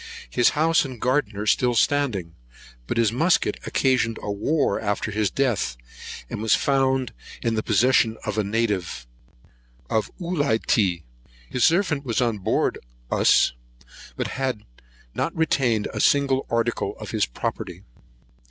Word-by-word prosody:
His 120 - +4
house 165 +2 +3
and 130 -4 -7
garden 125 -4 0
are 105 - -3
still 120 +3 +2
standing; 115 -11 +1 0.5
but - - -2
his 115 -2 +3
musket 160 +9 +1
occasioned 130 -4 +1
a 105 - -2
war 120 +3 0
after 105 +1 -2
his 105 -1 0
death, 120 - -1 0.5
and - - -5
was 110 -1 +4
found 135 -2 +1 0.3
in 115 - +1
the 110 - 0
possession 115 +1 +3
of 105 - -2
a 110 - +1
native 100 - -2 0.9
of 110 -2 0
Ulitea. 110 - +1 0.5
His 125 - +2
servant 165 -5 +2
was 120 -3 -1
on 115 -4 0
board 95 - 0 0.3
of - - +1
us, - - +4 0.6
but - - -3
had 130 -5 -3 0.5
not 165 - -2
retained 130 -9 +1
a - - -4
single 135 -2 +2
article 115 0 -1
of - - -8
his - - +1
property. - - -5
115 Hz, 145 wpm, -24 LUFS, 105-135 Hz, 0.9 s, His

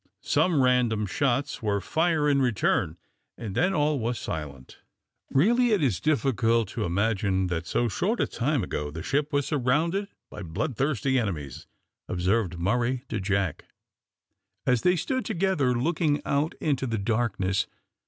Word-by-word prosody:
Some 160 -7 +2
random 120 -4 +2
shots 135 +5 -1
were 105 -2 0
fire 160 - +1
in 140 -1 +3
return, 95 -8 +1 0.4
and 105 -5 -6
then 180 - +2
all 150 -4 +1
was 120 +1 -1
silent. 70 -5 -6 0.5
"Really 235 - +3
it 195 -7 +2
is 115 -10 +1
difficult 120 -7 +1
to 105 -5 -3
believe 95 -1 +1
that 85 -1 -3
so 120 - +1
short 205 - -1
a - - +3
time 135 +1 -1
ago 75 0 -3
the 80 +2 -7
ship 145 +1 0
was 145 -1 +1
surrounded 155 +9 +1 0.2
by 105 - -8
bloodthirsty 130 - 0
enemies," 75 - -4 0.4
observed 90 +1 0
Murray 120 +8 0
to - - -2
Jack, 100 -4 -1 1.0
as 125 -2 +2
they 180 0 +3
stood 260 - -1
together 165 -9 +1
looking 150 +3 +1
out 145 +3 0
into 135 -3 0
the 115 -1 -1
darkness. 100 -3 0
125 Hz, 145 wpm, -26 LUFS, 100-150 Hz, 1.0 s, in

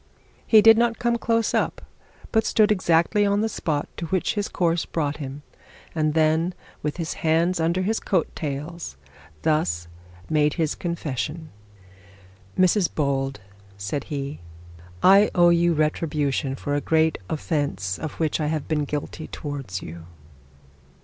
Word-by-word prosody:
He 215 -2 +7
did 225 +1 +8
not 235 -1 +2
come 235 -1 0
close 230 -1 +1
up, - - 0 0.5
but 220 -1 +3
stood 215 -1 +3
exactly 185 +1 +3
on 200 0 +2
the 220 - +1
spot 155 -8 -2
to 170 - -4
which 185 +6 0
his 205 -2 -1
course 170 -2 +1
brought 150 -3 -2
him, 140 0 -7 0.5
and 155 -1 0
then, 160 +3 +2 0.3
with 150 +1 -3
his 165 -3 -3
hands 165 +3 +2
under 170 +3 +1
his 220 +4 0
coat 180 -5 0
tails, 150 - -5 0.5
thus 85 - +1 0.4
made 150 +1 +1
a 160 - +3
confession. 160 -1 -4 1.1
'Mrs 185 0 +3
Bold,' 135 -5 -1 0.4
said 100 +8 -3
he, 140 0 -4 0.6
'I 200 +3 +7
owe 175 -1 +6
you 170 0 +3
retribution 150 -3 0
for 145 - -4
a 145 - +1
great 160 0 +2
offence 140 - -2
of 155 -1 -5
which 160 -1 -1
I 150 - 0
have 155 -1 -2
been 150 -2 0
guilty 150 +2 -5
towards 135 -11 -5
you.' 85 0 -9
160 Hz, 145 wpm, -24 LUFS, 145-180 Hz, 1.1 s, did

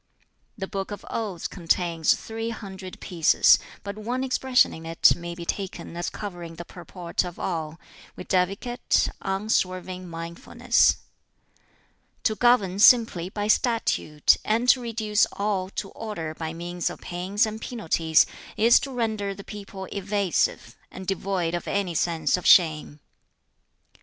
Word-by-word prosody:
"The 195 - -3
'Book 195 -1 -4
of 205 0 -7
Odes' 205 -7 -3
contains 170 -2 +1
three 225 +1 -5
hundred 190 -4 -8
pieces, 170 -3 +4 0.2
but 200 +1 -6
one 245 +4 -2
expression 260 -1 +2
in 160 - -9
it 165 0 +4
may 170 0 -7
be 170 -1 -7
taken 190 -2 -4
as 175 - -2
covering 175 -5 -7
the 170 +1 -8
purport 175 0 -4
of 175 -1 -7
all, 165 -2 -4 0.4
viz., 185 +1 0 0.6
Unswerving 185 -2 -2
mindfulness. 165 0 +1 1.3
"To 220 - +2
govern 215 -5 +3
simply 210 -6 +5
by 205 +1 -3
statute, 215 - +2
and 230 +3 0
to 255 - +6
reduce 220 -2 +1
all 200 -2 -1
to 195 0 -5
order 170 -8 -5
by 160 0 -5
means 175 +1 -3
of - - -9
pains 190 +5 0
and 220 0 -6
penalties, 165 -10 +2 0.3
is 230 +2 +6
to 275 - -5
render 215 -5 -2
the 200 - -10
people 200 -2 -8
evasive, 200 -2 -1
and 190 - -9
devoid 190 -2 -1
of 175 - -3
any 195 -3 -1
sense 165 -1 +1
of 180 - -3
shame. 155 -4 +4
190 Hz, 135 wpm, -25 LUFS, 170-215 Hz, 1.3 s, to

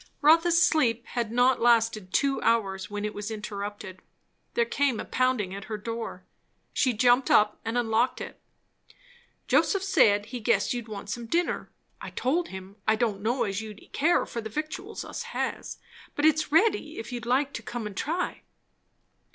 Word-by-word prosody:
Rotha's 330 +3 +5
sleep 240 -9 +2
had 235 -3 -3
not 245 +1 +3
lasted 225 -5 +3
two 275 +4 +1
hours 195 -5 +1
when 205 0 -4
it 210 - -3
was 205 +1 -5
interrupted. 205 -3 -6 0.6
There 235 - +3
came 265 -1 0
a - - -4
pounding 255 -7 0
at 200 +1 -7
her 215 - -4
door. 225 -3 -5 0.5
She 260 - +2
jumped 245 +3 +3
up 210 0 +4
and 225 +2 -2
unlocked 235 +1 +1
it. - - -8 1.1
"Joseph 390 -2 +3
said, 205 - +4
he 240 +3 -6
guessed 215 -1 +1
you'd 240 -2 -5
want 205 -2 -7
some 235 0 -5
dinner. 345 +7 -1 0.3
I - - -6
told 325 +8 0
him, 190 +1 -10
I 220 - +5
didn't 220 -3 -1
know 235 +5 +1
as 200 0 -2
you'd 215 -2 -10
care 320 +5 +3
for 235 - -5
the 220 - -6
victuals 310 - -5
us - - -6 0.2
has; - - -3 0.4
but 290 - +1
it's 310 -1 +3
ready, 330 -2 +2
if 225 - -6
you 245 - -3
like 255 +4 0
to - - -5
come 230 0 -5
and 210 -2 -6
try." 330 - -2
235 Hz, 175 wpm, -27 LUFS, 210-275 Hz, 1.1 s, Rotha's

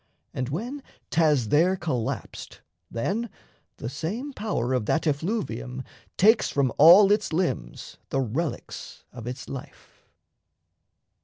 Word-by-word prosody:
And 130 -1 -3
when 240 - -4 0.3
'thas 150 -9 +3
there 170 - +4
collapsed, 130 -11 -4 0.3
then 210 - -2 0.5
the - - -5
same 205 - -4
power 200 - -2
Of 125 -5 0
that 165 - +1
effluvium 140 - -2 0.3
takes 220 +4 +5
from 135 -4 +1
all 180 +7 +9
its 210 -2 +1
limbs 160 - -2
The 135 - 0
relics 135 +6 -4
of 120 -1 -8
its 125 +2 -6
life. 135 - -10
155 Hz, 120 wpm, -26 LUFS, 125-200 Hz, 0.5 s, all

